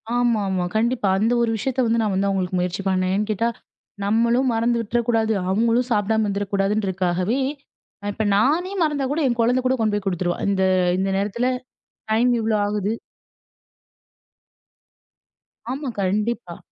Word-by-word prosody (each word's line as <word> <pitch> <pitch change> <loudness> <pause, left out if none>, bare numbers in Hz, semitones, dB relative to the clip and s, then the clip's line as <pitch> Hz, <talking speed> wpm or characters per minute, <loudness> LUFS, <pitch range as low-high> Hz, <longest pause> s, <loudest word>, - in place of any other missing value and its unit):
ஆமாமா. 210 -7 +1
கண்டிப்பா 230 -1 +1
அந்த 220 +4 +2
ஒரு 235 - +2
விஷயத்த 260 +4 -2
வந்து 230 0 +2
நான் 210 -3 0
வந்து 195 +1 +1
அவுங்களுக்கு 185 -2 -1
முயற்சி 180 +2 -2
பண்ணேன். 185 0 +1
ஏன் 210 +1 -1
கேட்டா, 215 +2 +1 0.6
நம்மளும் 235 +4 +2
மறந்து 235 +1 +1
விட்றக்கூடாது, 225 0 0 0.2
அவங்களும் 230 +5 +2
சாப்படாம 220 0 +2
இருந்துறக்கூடாதுன்ருக்காகவே. 195 0 0 0.7
இப்ப 220 - -2
நானே 310 - +2
மறந்தா 295 -3 0
கூட, 305 - 0
என் 240 -2 -1
குழந்த 245 +3 +3
கூட 260 - +3
கொண்டு 215 -2 +1
போய் 205 -1 -3
குடுத்துருவா. 175 -1 -1
இந்த, 190 -1 +1 0.4
இந்த 195 +1 0
நேரத்துல 210 +5 -1 0.6
டைம் 235 +3 +3
இவ்ளோ 220 0 +1
ஆகுது. 205 0 -1 2.8
ஆமா. 275 +1 -3
கண்டிப்பா. 200 -1 -1
220 Hz, 135 wpm, -22 LUFS, 195-235 Hz, 2.8 s, குழந்த